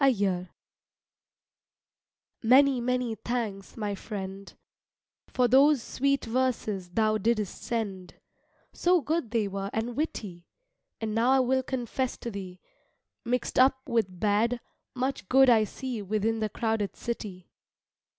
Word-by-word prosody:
Many, 260 +2 +5
many 250 -1 0
thanks 220 -4 -4
my 210 -2 -2
friend, 195 -1 -6 0.8
For 250 -1 +2
those 270 +1 +5
sweet 275 +1 0
verses 225 -6 -1
thou 215 +3 +1
didst 215 -2 -1
send, 200 -6 -4 0.6
So 355 -1 +3
good 310 -4 -1
they 220 -2 0
were 195 0 -4
and 230 +2 -2
witty; 200 - -4 0.5
And 220 -1 -3
now 230 +3 +2
I 265 0 +5
will 260 +1 +2
confess 255 0 -3
to 235 - -6
thee, 185 -3 -7 0.7
Mixed 245 +1 0
up 260 +1 +6
with 215 -8 0
bad, 220 +4 +2 0.4
much 260 -5 -2
good 265 -1 +6
I 220 -2 +5
see 245 +1 -5
Within 215 +3 0
the 215 -1 -1
crowded 220 -2 -1
city. 200 -6 -6
230 Hz, 120 wpm, -28 LUFS, 205-255 Hz, 0.8 s, up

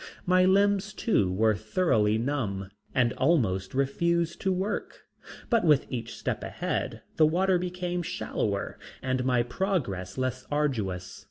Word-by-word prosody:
My 185 0 +4
limbs 200 +2 +3
too 105 - +1
were 110 +4 +3
thoroughly 110 - +1
numb 110 -7 -2 0.3
and 125 -2 +3
almost 115 - +1
refused 170 +5 0
to 190 - +1
work, 190 +3 -3 0.4
but 230 -5 +2
with 150 -5 +4
each 115 -3 -5
step - - -3
ahead - - -3
the 155 - +6
water 180 +3 +2
became 180 0 -2
shallower 100 -10 -3 0.2
and 130 -1 0
my 125 -2 +2
progress 125 - -2
less 130 0 -2
arduous. 110 -12 -1
135 Hz, 135 wpm, -28 LUFS, 110-180 Hz, 0.4 s, the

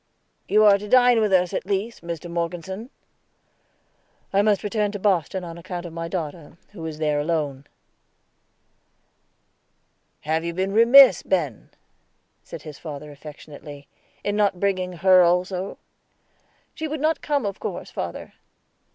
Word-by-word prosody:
"You 215 +1 +4
are 200 -1 +6
to 210 - -8
dine 245 0 +5
with 210 -2 +1
us, 180 -2 +3
at - - -3
least, 205 +3 -2
Mr. 170 0 -6
Morgeson." 175 +6 -4 1.4
"I 195 - +4
must 205 -1 +2
return 210 0 -1
to - - -3
Boston 190 -2 0
on 170 -1 -8
account 175 0 -6
of 170 - -8
my 165 0 -4
daughter, 165 -2 -6
who 185 -6 -10
is 155 -1 -6
there 150 -1 0
alone." 145 -3 -2 2.6
"Have 160 +2 -1
you 170 0 -4
been 190 +2 -1
remiss, 245 +5 +7
Ben," 155 - -2 0.7
said - - -10
his 150 -2 -10
father 150 -2 -8
affectionately, 145 0 -11 0.4
"in 205 - -1
not 205 -3 +1
bringing 185 -2 0
her 185 +2 +5
also?" 180 +2 0 1.0
"She 315 - -4
would 310 0 -4
not 315 +3 0
come, 285 -5 -1
of 200 -1 -4
course, - - -6
father." - - -6
180 Hz, 140 wpm, -23 LUFS, 165-205 Hz, 2.6 s, remiss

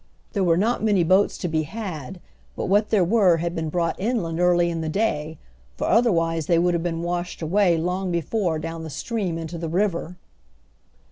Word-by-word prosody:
There 200 -4 +1
were 170 -2 +3
not 220 +4 +1
many 205 -5 +3
boats 185 +4 +3
to 180 - -3
be 160 -1 0
had, 175 - -6 0.4
but - - -3
what 205 +3 +2
there 210 -4 +3
were 185 -2 +4
had 170 +1 -2
been 160 -2 -3
brought 170 +1 -1
inland 185 -6 -1
early 175 -1 +3
in 165 -1 -3
the 160 - -3
day, 155 -5 -1 0.4
for - - -2
otherwise 165 -9 +2
they 170 - +3
would 175 +1 +2
have 170 - 0
been 165 -1 -3
washed 175 0 -3
away 180 +1 +3
long 180 +3 -2
before 170 +1 -1
down 165 +1 -5
the 160 - -6
stream 185 - -3
into 165 +1 -6
the 165 -1 -4
river. 180 -1 -1
175 Hz, 195 wpm, -23 LUFS, 165-195 Hz, 0.4 s, were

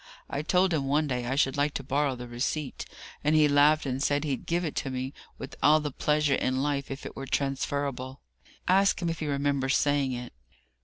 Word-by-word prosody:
I 140 - -1
told 180 +3 +2
him 140 -4 0
one 150 +3 +2
day 125 -3 -2
I 135 - -1
should 135 -2 +2
like 145 +1 +1
to 135 - -3
borrow 140 0 0
the 125 0 -8
receipt, 130 +4 -3 0.4
and 150 +1 +3
he 155 -1 +6
laughed 145 +2 +4
and 130 0 -2
said 145 +1 +1
he'd 140 -4 -3
give 170 +1 0
it 155 - -4
to 135 - -1
me 130 +1 -4 0.2
with 130 - -8
all 155 +1 +6
the 150 -1 -3
pleasure 150 +1 +1
in 130 0 0
life 140 -1 -1
if 135 0 -6
it - - -7
were 135 - -6
transferable. 135 -1 -2 0.5
Ask 195 +1 +4
him 175 -2 -1
if 165 - -5
he 155 - -3
remembers 140 -1 +1
saying 145 -2 +1
it. 125 0 -6
140 Hz, 215 wpm, -28 LUFS, 135-150 Hz, 0.5 s, he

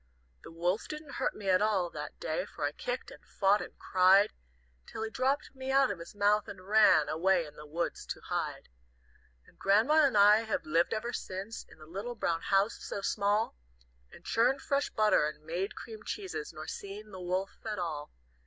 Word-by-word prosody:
"The - - -10
wolf 175 +5 -1
didn't 305 -1 -7
hurt - - 0
me 205 - -7
at 185 0 +4
all 195 -5 +1
that - - -7
day, - - -2
For - - -4
I - - 0
kicked - - -4
and - - -14
fought 200 +1 +2
and - - -9
cried, 190 +3 +4 0.5
Till 220 - -5
he 220 - -4
dropped 270 +4 0
me 265 0 -4
out 270 -2 +4
of 190 - -5
his 170 - -10
mouth, 205 0 +3
and 185 0 -10
ran 205 -8 +6
Away 175 +2 +2
in 150 -1 -13
the 150 - -11
woods 170 +3 -3
to - - -5
hide. - - -3 0.8
"And - - -23
Grandma 230 +11 +4
and 255 - 0
I 205 +1 +8
have 220 -1 -2
lived 165 +6 +2
ever 235 +3 -3
since 195 +4 -5
In - - -16
the 155 - -13
little 200 +9 -5
brown 170 -6 -1
house 195 +3 +2
so 200 - -5
small, 205 +2 +1 0.6
And - - -15
churned 255 +4 +2
fresh 280 0 0
butter 215 -8 +3
and 150 0 -8
made 175 +5 -3
cream 220 -2 -9
cheeses, 415 - -5
Nor - - -8
seen 205 +2 -7
the 185 -2 -8
wolf 185 +2 -2
at 215 -2 -3
all. 155 -5 -4
205 Hz, 200 wpm, -31 LUFS, 180-225 Hz, 0.8 s, I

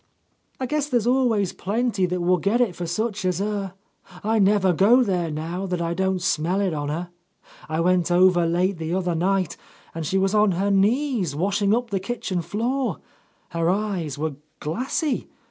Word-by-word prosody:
"I 260 - -1
guess 295 +2 -1
there's 240 -5 +1
always 240 -6 +2
plenty 210 -1 0
that 180 0 -2
will 180 +1 +2
get 200 +7 +1
it 225 -8 +1
for 175 - -4
such 210 +4 -2
as 180 -2 0
her. 200 -1 -3 0.5
I 220 +1 +1
never 195 -2 +4
go 225 +9 +5
there 180 -6 -1
now 165 +5 -4
that 180 -1 -2
I 170 0 -1
don't 190 0 -1
smell 175 +2 +1
it 195 -4 0
on 145 -1 -3
her. 170 +4 -4 0.6
I 160 +1 0
went 180 0 +2
over 175 -1 +4
late 180 +2 0
the 160 +2 -2
other 180 -2 0
night, 185 +1 0 0.4
and 165 - -4
she 185 +5 0
was 195 +1 +1
on 210 -2 +4
her 195 +3 0
knees, 205 - +1
washing 200 +5 +1
up 240 -1 -3
the 195 - 0
kitchen 190 -3 -3
floor. 235 - -1 0.5
Her 165 0 0
eyes 185 -7 -1
were 155 0 -2 0.3
glassy. 255 - -2
190 Hz, 180 wpm, -23 LUFS, 175-215 Hz, 0.6 s, go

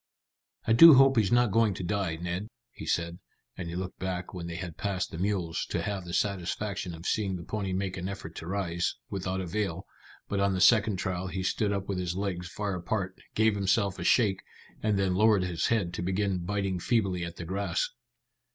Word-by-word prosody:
"I 110 - +3
do 160 +5 +10
hope 135 +1 +6
he's 105 -4 +3
not 120 -2 +4
going 110 -2 +3
to 90 - -5
die, 90 -2 -1
Ned," 90 +4 -4 0.2
he - - -9
said, 85 +1 -1 0.4
and 85 -2 -5
he 85 - -5
looked 95 0 -5
back 90 0 -4
when 85 -2 -5
they 85 - -5
had 85 -2 -6
passed 95 0 -2
the 80 - -6
mules, 90 -4 -1
to - - -1
have 100 -3 -3
the 85 - -7
satisfaction 95 -2 -2
of 80 +2 -11
seeing 100 -4 0
the 85 - -6
pony 100 0 -3
make 95 0 -2
an 90 +1 -3
effort 100 -5 -7
to 80 - -7
rise, 90 -3 -1 0.2
without 95 -1 -2
avail, 95 -1 -2 0.4
but 100 - -1
on 100 0 +2
the - - -1
second 110 +1 +5
trial 90 0 -2
he 95 0 -3
stood 100 +3 0
up 100 -1 -2
with 95 -2 -2
his 90 -1 -2
legs 95 -3 -3
far 105 +2 -3
apart, 95 +1 -2 0.2
gave 110 0 +4
himself 100 0 +1
a - - -3
shake, 100 -1 +3 0.4
and 105 -2 +1
then 95 -2 +1
lowered 105 0 +4
his 90 -2 -1
head 100 -7 0
to 90 - -3
begin 95 +1 0
biting 95 +1 -2
feebly 95 -4 +1
at 85 0 -5
the 85 - -7
grass. 95 0 -1
95 Hz, 210 wpm, -29 LUFS, 90-100 Hz, 0.4 s, do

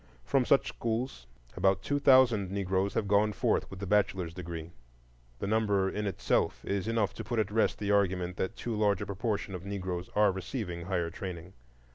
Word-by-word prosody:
From 135 -2 +2
such 140 - +4
schools 115 - -3 0.3
about 95 0 +2
two 145 0 0
thousand 125 -8 +5
Negroes 95 0 -1
have 100 - 0
gone 105 +1 +3
forth - - 0
with 95 - -9
the 100 - -4
bachelor's 95 -4 +1
degree. 85 -2 -6 0.7
The - - -4
number 100 -2 +2
in 105 0 -2
itself 100 - 0
is 100 0 -1
enough 115 -3 +1
to - - -6
put 120 - -3
at 110 -2 +1
rest 110 +1 +2
the 105 -1 -1
argument 90 -3 +1
that 95 - -2
too 120 -2 -4
large 105 -1 +2
a - - -4
proportion 100 0 -2
of 90 -1 -6
Negroes 95 -3 -4
are 105 -1 +5
receiving 95 -3 -5
higher 85 -3 -1
training. 90 -2 -7
100 Hz, 185 wpm, -30 LUFS, 95-110 Hz, 0.7 s, thousand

